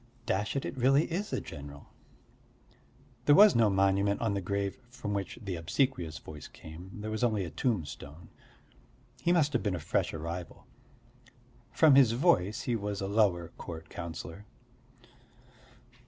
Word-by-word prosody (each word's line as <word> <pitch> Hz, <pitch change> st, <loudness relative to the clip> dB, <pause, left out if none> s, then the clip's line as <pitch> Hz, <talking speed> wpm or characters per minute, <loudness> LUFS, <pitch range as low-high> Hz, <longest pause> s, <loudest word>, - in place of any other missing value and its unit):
Hm, -, -, -29 dB, 0.2 s
dash 105 Hz, +6 st, -1 dB
it, 140 Hz, -, -1 dB
it -, -, -4 dB
really 135 Hz, +4 st, +4 dB
is 195 Hz, +5 st, -2 dB
a -, -, 0 dB
general! 70 Hz, -2 st, -10 dB, 1.4 s
There 145 Hz, -, +7 dB
was 210 Hz, +2 st, +8 dB
no 115 Hz, -2 st, +5 dB
monument 100 Hz, +1 st, +2 dB
on 115 Hz, -3 st, 0 dB
the 100 Hz, -, -1 dB
grave 100 Hz, +3 st, -2 dB
from 110 Hz, -4 st, -5 dB
which 100 Hz, -1 st, -3 dB
the 100 Hz, -5 st, -4 dB
obsequious 85 Hz, -, -1 dB
voice 75 Hz, 0 st, -10 dB
came, 80 Hz, +4 st, -11 dB
there 110 Hz, +1 st, -4 dB
was 110 Hz, +3 st, -2 dB
only 110 Hz, -5 st, +1 dB
a 85 Hz, -, -7 dB
tombstone. 80 Hz, -, -3 dB, 0.9 s
He 170 Hz, -, +2 dB
must 155 Hz, -4 st, +3 dB
have -, -, +1 dB
been 100 Hz, -4 st, -1 dB
a -, -, -4 dB
fresh -, -, 0 dB
arrival. 85 Hz, +2 st, -6 dB, 1.1 s
From 155 Hz, -3 st, +5 dB
his 130 Hz, -4 st, +6 dB
voice 120 Hz, -, +2 dB
he 120 Hz, -, 0 dB
was 100 Hz, -2 st, -3 dB
a 95 Hz, -, -2 dB
lower 100 Hz, -5 st, +2 dB
court 80 Hz, -1 st, -8 dB
councillor. 85 Hz, +3 st, -7 dB
100 Hz, 155 wpm, -30 LUFS, 85-120 Hz, 1.4 s, was